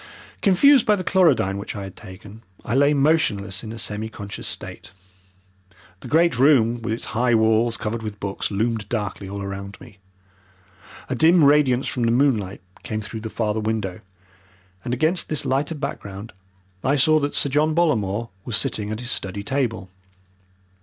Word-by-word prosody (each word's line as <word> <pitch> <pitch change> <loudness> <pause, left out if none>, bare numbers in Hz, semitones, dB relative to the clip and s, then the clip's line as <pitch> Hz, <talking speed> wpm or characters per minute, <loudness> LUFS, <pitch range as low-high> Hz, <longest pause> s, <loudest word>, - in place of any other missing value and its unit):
Confused 255 +7 +5
by 210 - +5
the 185 - -4
chlorodyne 165 - +2
which 100 - -6
I 100 - -5
had 95 -1 -9
taken, 100 +4 -12 0.2
I - - -2
lay 140 +3 +4
motionless 135 -11 +1
in 110 - -7
a 115 - -7
semi 105 +1 -4
conscious 100 -2 -7
state. 95 - -7 1.1
The - - -10
great 160 -5 +2
room 120 -4 +4
with 115 -1 -3
its 115 - -3
high 120 +1 +2
walls 110 +1 +2
covered 110 +2 -3
with 105 -2 -7
books 100 -1 -3
loomed 110 0 -2
darkly 105 -4 -3
all 100 0 -5
round 100 0 -7
me. 105 -5 -15 1.1
A - - -2
dim 160 +5 +5
radiance 140 -3 +4
from 125 - -3
the 115 0 +2
moonlight 115 -7 +1 0.2
came 110 - -4
through 110 +1 -7
the 110 - -5
farther 110 -1 -1
window, 105 -4 -2 0.8
and 120 - -4
against 160 +8 +1
this 155 -2 +1
lighter 140 +5 0
background 105 -7 -6 0.5
I 135 +2 +2
saw 155 +3 +4
that 145 0 -2
Sir 140 - +4
John 155 +3 +1
Bollamore 115 - 0
was 115 -2 0
sitting 105 -1 -1
at 110 +2 -4
his 120 0 -2
study 100 +1 -3
table. 115 -6 -2
115 Hz, 170 wpm, -22 LUFS, 105-140 Hz, 1.1 s, Confused